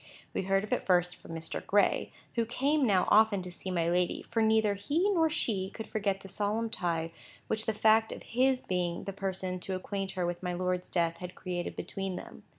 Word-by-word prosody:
We -, -, 0 dB
heard 195 Hz, +1 st, +1 dB
of 210 Hz, -, -2 dB
it -, -, -1 dB
first 180 Hz, -1 st, +3 dB
from -, -, -11 dB
Mr. 160 Hz, 0 st, -4 dB
Gray, 205 Hz, 0 st, +2 dB, 0.2 s
who 230 Hz, -, +1 dB
came 275 Hz, +4 st, +1 dB
now 190 Hz, -4 st, +3 dB
often 210 Hz, -3 st, +5 dB
to 180 Hz, -, -6 dB
see 185 Hz, -, -6 dB
my 170 Hz, -2 st, +1 dB
lady, 175 Hz, +1 st, +1 dB
for 225 Hz, -, -1 dB
neither 220 Hz, -1 st, +4 dB
he 310 Hz, -, +1 dB
nor 325 Hz, -4 st, +3 dB
she 200 Hz, -11 st, -1 dB
could 220 Hz, -, -7 dB
forget 200 Hz, -2 st, -1 dB
the 195 Hz, -, -10 dB
solemn 215 Hz, +3 st, -1 dB
tie 165 Hz, -3 st, -1 dB, 0.3 s
which 220 Hz, 0 st, -1 dB
the 220 Hz, -, +2 dB
fact 220 Hz, +1 st, +4 dB
of -, -, -7 dB
his 255 Hz, +2 st, +2 dB
being 175 Hz, -2 st, -1 dB
the 195 Hz, -, -5 dB
person 190 Hz, -2 st, -3 dB
to 190 Hz, +1 st, -3 dB
acquaint 195 Hz, +1 st, -3 dB
her 180 Hz, -2 st, -1 dB
with 175 Hz, 0 st, -3 dB
my 180 Hz, -1 st, -2 dB
lord's 180 Hz, 0 st, -1 dB
death 170 Hz, -2 st, +1 dB
had 180 Hz, +1 st, -7 dB
created 175 Hz, -1 st, -4 dB
between 195 Hz, -1 st, -4 dB
them. -, -, -9 dB
195 Hz, 215 wpm, -31 LUFS, 180-220 Hz, 0.3 s, often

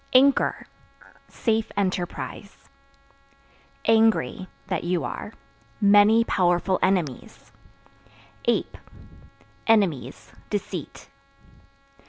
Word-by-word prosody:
Anchor 270 Hz, +1 st, +3 dB, 0.6 s
Safe 225 Hz, -2 st, -1 dB
enterprise. 185 Hz, -3 st, -4 dB, 1.2 s
Angry 225 Hz, -4 st, +2 dB, 0.2 s
(That 185 Hz, -2 st, -3 dB
you 175 Hz, 0 st, -1 dB
are) -, -, -6 dB, 0.5 s
many 205 Hz, +2 st, +5 dB
powerful 180 Hz, -2 st, +1 dB
enemies. 180 Hz, -9 st, -2 dB, 0.9 s
Ape -, -, 0 dB, 0.9 s
Enemies, 175 Hz, -, +1 dB, 0.2 s
deceit. 205 Hz, -2 st, -5 dB
200 Hz, 65 wpm, -24 LUFS, 180-220 Hz, 1.2 s, many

